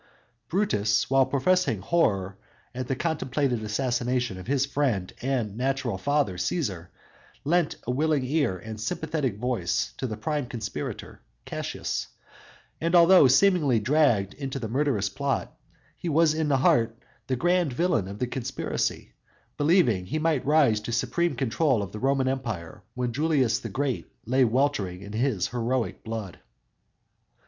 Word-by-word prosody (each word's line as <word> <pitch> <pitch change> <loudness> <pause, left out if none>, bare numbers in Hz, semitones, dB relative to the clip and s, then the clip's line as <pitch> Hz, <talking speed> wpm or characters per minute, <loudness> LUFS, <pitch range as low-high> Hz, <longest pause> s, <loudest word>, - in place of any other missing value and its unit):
Brutus, 105 - +1
while 135 -1 +4
professing 140 - +1
horror 100 - +1 0.4
at 125 0 -4
the 135 - -1
contemplated 140 -5 -1
assassination 120 -1 -1
of 90 - -10
his 135 0 +2
friend 130 -10 -1
and 120 -6 -1
natural 125 -4 -1
father 145 -6 0
Cæsar, 95 - -2 0.6
lent 165 +2 +1
a 125 - -1
willing 145 0 +1
ear 135 -8 0
and 110 +3 -8
sympathetic 140 -1 -2
voice 125 +1 -1
to 130 - -2
the 110 -3 -5
prime 145 +4 -2
conspirator 120 -3 -6 0.2
Cassius; - - -4 0.7
and 170 +2 +1
although 175 -3 +7
seemingly 145 - +4
dragged 120 -6 +2
into 135 -1 -5
the 120 -4 -4
murderous 125 -4 0
plot, 140 +4 -2 0.4
he 175 - -4
was 160 0 +4
in 155 -1 -1
heart 120 -4 +3 0.3
the 130 - 0
grand 175 +2 +2
villain 145 - +1
of 100 +1 -7
the 125 - -1
conspiracy, 125 0 -3 0.4
believing 145 - +3
he 155 - -2
might 155 -3 +1
rise 145 -8 +4
to 110 +2 -6
supreme 125 +7 0
control 130 -1 +1
of 95 - -7
the 105 - -7
Roman 135 +1 +1
Empire 115 -9 -4
when 125 -1 -2
Julius 135 -5 +2
the 115 - -6
Great 130 +4 -2 0.2
lay 130 +3 +3
weltering 110 -7 0
in 100 +1 -9
his 110 -5 0
heroic 120 0 -2
blood. 110 -5 -6
130 Hz, 145 wpm, -26 LUFS, 110-145 Hz, 0.7 s, although